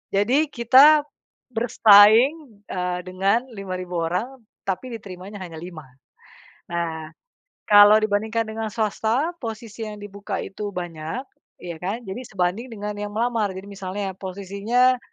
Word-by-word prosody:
Jadi 255 +10 +3
kita 285 +5 +6 0.5
bersaing, 225 +2 +5
eee, 180 -1 -3
dengan 195 +7 +1
5.000 185 -3 -4
orang 240 +8 -3 0.2
tapi 195 +6 -3
diterimanya 195 -1 -9
hanya 165 -3 -9
5. 170 -3 -9 0.9
Nah, 160 -2 -3 0.6
kalau 205 0 +9
dibandingkan 220 +2 0
dengan 220 0 -5
swasta, 225 - 0
posisi 225 -1 -6
yang 210 -1 -8
dibuka 200 0 -5
itu 205 +1 -6
banyak, 175 +6 -5 0.4
ya 170 -2 -6
kan, 200 +8 -4
jadi 195 +1 -6
sebanding 195 +5 -2
dengan 210 0 -5
yang 205 0 -5
melamar. 225 -4 0
Jadi 190 +1 -8
misalnya, 190 0 -5
posisinya, 200 +7 0
205 Hz, 125 wpm, -23 LUFS, 185-230 Hz, 0.9 s, kalau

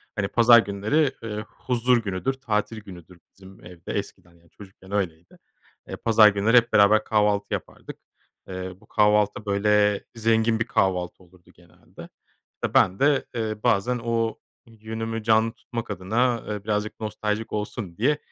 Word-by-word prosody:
Hani 100 -2 -1
pazar 120 +2 +6
günleri, 110 +9 0
eee, 105 -2 -4
huzur 125 0 0
günüdür, 105 +3 -2
tatil 110 -4 -3
günüdür 90 -3 -13
bizim 95 -2 -16
evde 85 -1 -9
eskiden 85 -1 -8
çocukken 95 -1 -15
öyleydi. 85 -5 -4 0.5
Eee, - - -6
pazar 110 -1 +5
günleri 105 +4 +3
hep 120 -1 +3
beraber 105 +1 +5
kahvaltı 105 -2 0
yapardık. - - -7 0.5
Eee, 95 0 -6
bu - - -20
kahvaltı 105 0 +2
böyle 105 0 +2
zengin 115 0 +1
bir 115 - 0
kahvaltı 90 -1 -1
olurdu 90 0 -22
genelde. 85 -2 -16 0.7
Ben 95 +1 +4
de, 140 0 +2
eee, 110 -2 -2
bazen 120 +5 +1
o 115 -1 -1 0.3
yönümü 110 0 -6
canlı 110 0 +3
tutmak 115 -3 -7
adına, 115 +5 0
e, 105 -1 -4
birazcık 105 0 -3
nostaljik 105 0 -3
olsun 105 -4 -5
diye 140 +7 +2
105 Hz, 140 wpm, -24 LUFS, 95-115 Hz, 0.7 s, pazar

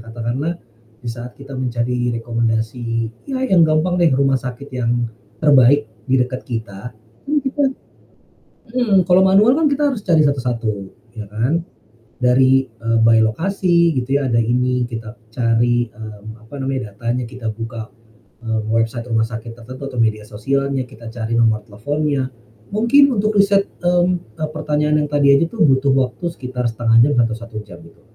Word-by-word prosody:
Katakanlah 120 +8 -3 0.5
di - - -4
saat 120 +1 -9
kita 140 0 -11
mencari 120 -1 -1
rekomendasi, 115 0 -2 0.2
ya 265 -1 -1
yang 175 -9 +4
gampang 170 +4 +1
deh 170 - +5
rumah 135 -1 +2
sakit 130 +2 -8
yang 120 -2 -1 0.3
terbaik 140 -2 +5 0.2
di 130 - +3
dekat 125 0 -1
kita, 115 -1 -6 0.3
itu 295 -2 +1
kita 285 - +1 1.1
mhm, 225 -6 +3
kalau 180 +1 +4
manual 210 +8 +5
kan 320 - +2
kita 285 0 +1
harus 230 -7 -5
cari 165 -4 +4
satu-satu 125 -5 0 0.5
ya 105 - -5
kan 125 +12 -1 0.5
dari, 130 +1 +3
eee, 115 0 -1
by 115 0 +5
lokasi 170 - +2
gitu 135 0 0
ya, 130 - -1
ada 115 - +3
ini 125 +1 +1
kita 115 -1 -8 0.2
cari, 120 -1 +1
mmm, 110 +1 -11
apa 145 - -10
namanya, 130 -5 -3
datanya 120 +3 -2
kita 125 -2 -7
buka, 115 0 -6 0.6
eee, 110 -1 -1
website 115 +1 -1
rumah 115 -2 +1
sakit 115 0 -7
tertentu 130 +4 -9
atau 130 -3 -5
media 110 -1 0
sosialnya, 135 +5 -1
kita 115 -2 -12
cari 115 -1 -2
nomor 110 -2 +2
teleponnya. 140 +6 -2 0.5
Mungkin 235 +6 +5
untuk 210 0 +1
riset, 200 0 +3
mmm, 175 -8 0
eee, 155 -1 -3
pertanyaan 150 0 0
yang - - -5
tadi 145 -1 +3
aja 140 +4 +4
tuh 215 +3 0
butuh 135 -1 +3
waktu 130 +5 -1
sekitar 125 -4 -4
1/2 115 0 +2
jam 145 - +1
atau 115 - -1
1 115 -1 -10
jam 85 -5 -13
itu. 85 - -19
125 Hz, 160 wpm, -19 LUFS, 115-150 Hz, 1.1 s, deh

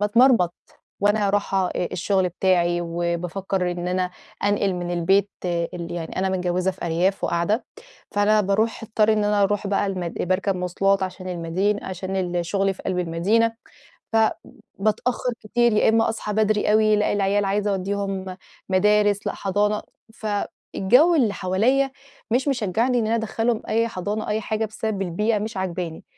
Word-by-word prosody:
باتمرمط 210 -4 +4 0.5
وأنا 205 0 +3
راحة 195 -2 +1
أ 180 - -2
الشغل 185 +1 +1
بتاعي 175 -1 +1
وبافكّر 175 +2 -2
إن 175 0 -4
أنا 180 0 0 0.3
أنقِل 205 -1 +1
من 175 -1 -4
البيت 190 +4 +2 0.2
ال 170 0 -3
يعني 170 -2 -5
أنا 190 +1 +1
متجوّزة 185 0 0
في 185 - -8
أرياف 175 +4 +1
وقاعدة 170 +8 0 0.5
فأنا 210 +1 +3
باروح 210 +4 0
اضطر 220 0 +2
إن 210 -1 +1
أنا 205 -1 +2
اروح 205 +1 +1
بقى 200 0 +1
المد 180 -3 -3
باركب 185 +1 0
مواصلات 195 +2 +1
عشان 185 0 -5
المدين 180 +4 -1
عشان 190 +1 -4
ال 175 -2 -1
شُغلي 195 +2 +1
في 190 - -12
قلب 185 -1 -2
المدينة 190 +7 +1 0.6
فبتأخر 225 +2 -1
كتير 235 +2 +2
يا 210 - +3
إما 225 0 +3
أصحى 220 -1 -3
بدري 215 0 +2
أوي، 215 0 +4
لأ 210 - +1
العيال 205 0 +1
عايزة 205 +1 0
اودّيهم 195 -1 -3 0.3
مدارس، 205 +1 +3
لأ - - -1
حضانة، 205 +2 0 0.3
ف 220 - -8 0.5
الجو 260 - +5
اللي 245 -10 +3
حواليّا 235 +9 +1 0.4
مش 255 +5 +1
مشجعني 245 0 +1
إن 220 - 0
أنا 225 - +1
ادخلهم 225 0 -1
أي 230 +1 +1
حضانة 210 +1 -4
أي 210 +1 0
حاجة 220 +1 -2
بسبب 215 -2 -3
البيئة 210 +5 0
مش 215 +1 -5
عاجباني، 180 -3 -4
200 Hz, 155 wpm, -23 LUFS, 185-215 Hz, 0.6 s, الجو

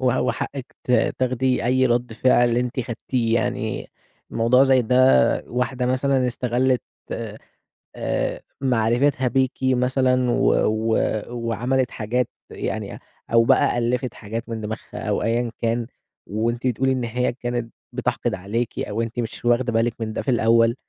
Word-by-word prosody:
و 130 -1 +2
وحقِّك 135 -3 -3
ت - - -4 0.3
تاخدي 130 0 +1
أي 130 +1 +3
رَد 120 -1 0
فعل 120 0 +3
أنتِ 125 +1 -1
خدتيه، 115 0 -1
يعني - - -2 0.4
موضوع 115 +3 +4
زي 130 -2 +4
ده 125 - +4
واحدة 125 +1 -1
مثلًا 130 0 +1
استغلِّت 125 +1 0 0.3
آآ - - -5 0.6
آآ، - - -2 0.2
معرفِتها 125 +2 +2
بيكِ 130 +1 +2
مثلًا 130 -1 +2
و - - +1 0.2
و 110 +1 +1 0.3
وعملِت 120 +2 -1
حاجات 120 +3 -1 0.2
يعني - - -4 0.3
أو 115 0 +6
بقى 120 - +3
ألِّفت 120 +1 -1
حاجات 115 +3 -6
من 110 -1 -4
دِماغها 110 +1 -6
أو - - 0
أيًا 115 +1 0
كان، 115 0 0 0.4
وأنتِ 115 +5 -1
تقولي 130 +2 +1
إن 130 -2 -1
هي 120 +2 -1
كانت 120 -1 -4 0.2
بتحقد - - -1
عليكِ 110 +5 -3
أو 105 +2 -2
أنتِ 115 +1 -4
مش 120 0 -5
واخدة 120 0 +2
بالِك 115 +1 +2
من 110 -1 -3
ده - - -2
في 130 - -1
الأول، 115 0 +4
120 Hz, 145 wpm, -23 LUFS, 115-130 Hz, 0.6 s, أو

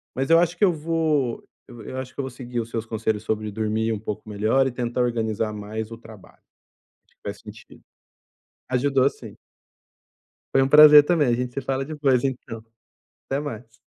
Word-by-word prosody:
mas 135 +3 -2
eu 165 - +7
acho 175 0 +1
que - - -1
eu 185 - +4
vou 155 -5 -1 0.2
eu 120 - -12
eu 130 - -7
acho 130 0 -6
que - - -14
eu - - 0
vou 130 - -4
seguir 125 -1 -6
os 115 0 -4
seus 115 -1 -4
conselhos 110 -1 -2
sobre 110 -1 -2
dormir 110 +1 -1
um 105 - -4
pouco 105 0 -6
melhor 110 +6 +1
e 130 - -2
tentar 120 0 -2
organizar 110 -3 -1
mais 105 +1 -6
o 115 - -7
trabalho, 110 -4 -16 0.7
que - - -34
faz - - -6
sentido. - - -14 0.9
Ajudou, 135 +1 +2
sim. - - -12 1.2
Foi 135 - +5
um 135 - +2
prazer 150 0 +9
também, 155 -2 +2
a 120 - +2
gente 125 0 -3
se 140 - -3
fala 135 +1 -2
depois, 140 -5 +1
então, 120 -4 -4 0.6
até 135 - -1
mais. 120 -5 -8
125 Hz, 190 wpm, -23 LUFS, 110-140 Hz, 1.2 s, prazer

